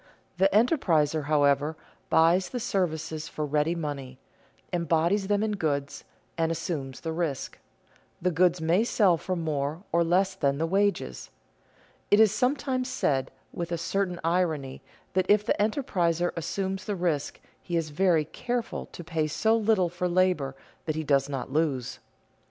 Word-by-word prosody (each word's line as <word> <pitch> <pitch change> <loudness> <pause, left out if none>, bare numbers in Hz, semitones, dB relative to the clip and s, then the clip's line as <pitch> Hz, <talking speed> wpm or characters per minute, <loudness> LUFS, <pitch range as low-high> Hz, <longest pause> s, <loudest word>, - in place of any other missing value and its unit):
The 190 +1 +5
enterpriser, 165 - +2
however, 145 +1 +2 0.3
buys 170 +3 +4
the 250 - -4
services 165 -8 -2
for 155 - -4
ready 150 +3 +1
money, 140 -5 -5 0.6
embodies 170 +3 +1
them 205 +1 +1
in 220 - 0
goods, 145 -8 -2 0.3
and 165 0 +2
assumes 150 -6 -4
the 160 - -3
risk; 160 -5 -3 0.6
the 180 +1 +1
goods 175 +1 +3
may 165 +6 +2
sell 205 -6 +3
for 185 +3 -3
more 155 0 -2
or 170 0 +3
less 185 +3 +2
than 140 -7 0
the 160 - 0
wages. 195 - 0 0.8
It 205 - +5
is 220 -3 +6
sometimes 255 +1 0
said 135 - 0 0.2
with 170 0 -4
a 170 - 0
certain 180 +1 -1
irony 160 -6 0 0.3
that 185 0 +1
if 210 0 +4
the - - +2
enterpriser 180 - +1
assumes 190 +3 -3
the 205 - -2
risk 170 -6 -1 0.2
he 175 -2 -2
is 160 -2 -2
very 165 -1 +2
careful 240 +8 -4
to 175 - -8
pay 160 -1 -1
so 220 +9 +2
little 215 -5 +2
for 180 +1 -2
labor 175 -7 +1 0.3
that 155 - -1
he 160 - -2
does 140 -2 +2
not 135 -1 -4
lose. 145 -6 -1
170 Hz, 155 wpm, -27 LUFS, 150-195 Hz, 0.8 s, is